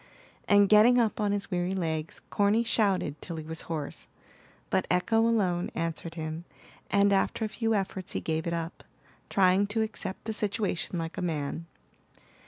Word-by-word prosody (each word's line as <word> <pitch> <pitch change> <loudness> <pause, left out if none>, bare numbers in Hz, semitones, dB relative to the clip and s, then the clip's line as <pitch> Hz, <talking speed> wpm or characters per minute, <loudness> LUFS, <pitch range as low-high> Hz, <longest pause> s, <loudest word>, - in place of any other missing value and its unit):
And 205 -1 +6
getting 220 +4 +6
up 225 -2 +1
on 205 -1 +1
his 200 -1 -3
weary 180 +1 -1
legs, 160 -3 -3
Corny 205 +3 +3
shouted 200 -9 +1
till 170 - -5
he 160 - -5
was 160 0 -3
hoarse; 155 -4 -4 0.6
but - - +1
echo 180 +5 +2
alone 205 -6 +2
answered 165 0 -3
him, 160 0 -5 0.5
and 200 0 +4
after 195 +3 +1
a - - -4
few 225 0 0
efforts 190 -2 -3
he - - -1
gave 160 +1 -2
it 170 - -1
up, 165 +1 -4 0.5
trying 190 +1 +4
to 220 +2 0
accept 210 -3 -4
the 220 - -2
situation 205 -4 0
like 165 +3 -4
a - - -3
man. 160 -1 -3
190 Hz, 170 wpm, -28 LUFS, 165-210 Hz, 0.6 s, And